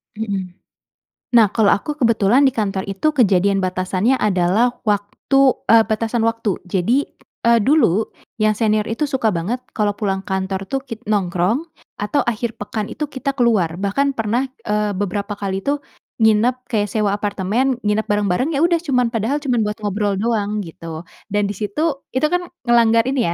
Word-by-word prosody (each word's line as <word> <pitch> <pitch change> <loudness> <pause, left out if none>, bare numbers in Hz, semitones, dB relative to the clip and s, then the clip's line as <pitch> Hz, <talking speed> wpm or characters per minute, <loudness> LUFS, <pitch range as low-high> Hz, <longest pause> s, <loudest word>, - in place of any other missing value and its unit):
Mmm. 195 -4 -4 0.8
Nah 225 -3 +7
kalau 215 -1 +3
aku 295 +9 -1
kebetulan 230 +1 +3
di 265 - +2
kantor 195 -3 -1
itu 195 +11 0
kejadian 200 -7 +3
batasannya 185 +6 0
adalah 200 +4 +2 0.2
waktu, 205 +6 0 0.3
eee, 230 0 +7
batasan 225 +1 0
waktu. 230 -4 -1
Jadi, 225 +9 +2 0.4
eee, 235 0 +5
dulu 225 - +3 0.3
yang 215 -1 +2
senior 215 -1 +1
itu 225 +6 -3
suka 250 -6 0
banget 195 +10 -2 0.2
kalau 205 -2 0
pulang 195 -3 -1
kantor 190 0 -2
itu 270 - -1
kit 230 -2 -7
nongkrong 195 - 0 0.3
atau 210 +8 0
akhir 235 0 -2
pekan 210 0 -3
itu 300 -2 -4
kita 275 +1 -3
keluar. 215 -10 +2
Bahkan 275 +8 0
pernah, 235 +4 0 0.2
eee, 210 0 +1
beberapa 205 +1 -3
kali 195 -1 -3
itu 285 +1 0 0.4
nginep 230 +4 +3
kayak 210 -3 +1
sewa 210 0 0
apartemen, 210 +6 0
nginep 210 +1 0
bareng-bareng, 205 - 0
ya 285 - +1
udah 340 0 +3
cuman 250 -7 0
padahal 235 +7 -1
cuman 245 -6 +1
buat 210 - -2
ngobrol 205 0 0
doang 210 0 -1
gitu. 165 -1 -8 0.2
Dan 205 0 0
di - - -3
situ 275 - -2
itu 260 +4 +2
kan 355 0 0 0.2
ngelanggar 230 -2 +4
ini 265 -4 +1
215 Hz, 160 wpm, -19 LUFS, 200-245 Hz, 0.8 s, Nah